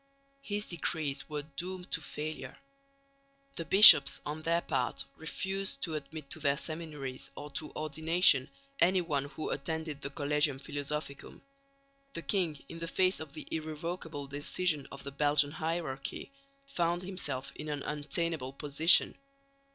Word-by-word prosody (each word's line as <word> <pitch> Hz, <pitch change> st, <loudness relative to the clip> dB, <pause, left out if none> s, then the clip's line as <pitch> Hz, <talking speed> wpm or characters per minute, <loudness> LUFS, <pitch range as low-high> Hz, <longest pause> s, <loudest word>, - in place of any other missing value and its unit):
His 205 Hz, -4 st, -3 dB
decrees 155 Hz, -5 st, -2 dB
were 150 Hz, -1 st, -4 dB
doomed 180 Hz, +5 st, -7 dB
to 165 Hz, -, 0 dB
failure. 155 Hz, +1 st, -6 dB, 1.0 s
The 165 Hz, -, -4 dB
bishops 175 Hz, -3 st, +10 dB
on 150 Hz, +2 st, -5 dB
their 170 Hz, +2 st, +1 dB
part 130 Hz, -7 st, -2 dB
refused 195 Hz, +8 st, -2 dB
to 165 Hz, -, -1 dB
admit 155 Hz, 0 st, -7 dB
to -, -, -1 dB
their 140 Hz, -2 st, +1 dB
seminaries 150 Hz, -, -6 dB
or 145 Hz, 0 st, -8 dB
to 150 Hz, +1 st, -5 dB
ordination 155 Hz, -2 st, +3 dB, 0.3 s
anyone 170 Hz, -6 st, +2 dB
who 155 Hz, +2 st, -6 dB
attended 155 Hz, 0 st, -4 dB
the 140 Hz, -, -4 dB
Collegium 145 Hz, 0 st, 0 dB
Philosophicum. 145 Hz, +1 st, -6 dB, 0.7 s
The 170 Hz, -, -4 dB
king, 170 Hz, -8 st, -1 dB
in 165 Hz, -, -9 dB
the 165 Hz, -, -5 dB
face 185 Hz, +2 st, +1 dB
of 155 Hz, -3 st, -8 dB
the 155 Hz, -, -9 dB
irrevocable 160 Hz, -1 st, -5 dB
decision 145 Hz, +2 st, -2 dB
of 140 Hz, -, -10 dB
the 140 Hz, -, -6 dB
Belgian 145 Hz, 0 st, +2 dB
hierarchy, 160 Hz, -, -4 dB, 0.3 s
found 175 Hz, -8 st, -1 dB
himself 140 Hz, -8 st, -4 dB
in 150 Hz, -, -7 dB
an 145 Hz, -1 st, -4 dB
untenable 150 Hz, -2 st, -1 dB
position. 150 Hz, +4 st, +4 dB
155 Hz, 135 wpm, -31 LUFS, 145-170 Hz, 1.0 s, bishops